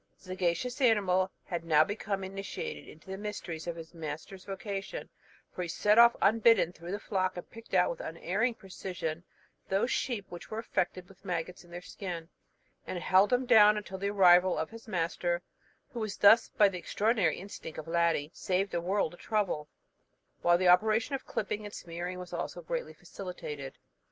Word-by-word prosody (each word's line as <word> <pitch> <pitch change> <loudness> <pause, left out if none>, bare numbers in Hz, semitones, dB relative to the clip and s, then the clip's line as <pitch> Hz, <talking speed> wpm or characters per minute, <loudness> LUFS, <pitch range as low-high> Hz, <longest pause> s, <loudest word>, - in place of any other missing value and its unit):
The - - -27
sagacious 185 - -1
animal 195 -6 +3
had 170 -2 -4
now 155 -2 +5
become 200 +2 -3
initiated 195 - -6
into - - -15
the 190 - -5
mysteries 185 -6 -5
of 170 - -2
his 165 0 -10
master's 165 +4 -7
vocation, 195 - -5 0.4
for - - -4
off - - -1
he - - -5
set 210 +6 +3 0.2
unbidden 225 -5 +5
through 170 +1 -8
the 205 - -2
flock, 185 -3 -1
and 175 - -7
picked 230 -3 -7
out 180 -1 +4
with 170 - -7
unerring 195 +9 -1
precision 180 -5 -5 0.5
those 195 +6 +1
sheep 225 -6 -1
which 175 - -9
were 215 - -5
affected 185 -5 -2
with 195 +1 -19
maggots 180 -1 -4
in 175 - -19
their 175 +1 -8
skin, 175 -5 -6 0.6
and 185 - -3
held 185 +4 +4
them 250 +1 +2
down 215 -3 +7
until 190 -2 -6
the 200 +1 -1
arrival 185 -2 +6
of - - -2
his 230 0 -11
master; 175 -1 -1 0.5
who 240 - -4
was 215 -2 -3
thus, 220 +3 +6
by 205 - +5
the 185 -2 -4
extraordinary 205 -3 +1
instinct 185 -4 -8
of 155 - -7
Ladie, 165 -3 +1
saved 190 +1 -1
a 170 - 0
world 185 -1 0
of 175 - -14
trouble, 190 -9 -1 0.7
while 175 0 +5
the 185 0 +2
operation 215 +8 +4
of 270 - -4
clipping 210 0 -3
and 205 0 -8
smearing 175 +2 -5
was 180 -1 -8
also - - -4
greatly - - -4
facilitated. 150 -7 -7
185 Hz, 180 wpm, -30 LUFS, 175-210 Hz, 0.7 s, down